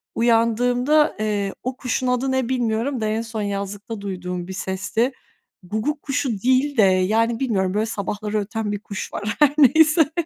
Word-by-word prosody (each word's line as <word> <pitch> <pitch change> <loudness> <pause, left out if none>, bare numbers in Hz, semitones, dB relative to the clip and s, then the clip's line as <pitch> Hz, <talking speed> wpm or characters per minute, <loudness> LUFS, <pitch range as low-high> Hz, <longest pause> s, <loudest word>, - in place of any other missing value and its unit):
uyandığımda, 245 +5 +2
eee, 205 -2 -1
o 255 +1 -3
kuşun 255 0 -2
adı 250 +2 0
ne 260 -2 0
bilmiyorum 245 +1 -1
da - - 0
en 215 +1 -1
son 225 -1 -5
yazlıkta 200 +1 -4
duyduğum 180 -2 -5
bir 190 - -6
sesti. 205 +6 -1 0.5
Guguk 220 - -2
kuşu 280 -1 -1
değil 260 +3 +2
de - - +6
yani 215 +5 +2
bilmiyorum 195 -8 0
böyle 210 +2 +1
sabahları 210 0 -3
öten 215 +1 -3
bir 205 - -3
kuş 205 -1 -7
var 215 +2 -3
her 295 -2 +5
neyse. 310 +2 +5
225 Hz, 165 wpm, -22 LUFS, 205-255 Hz, 0.5 s, de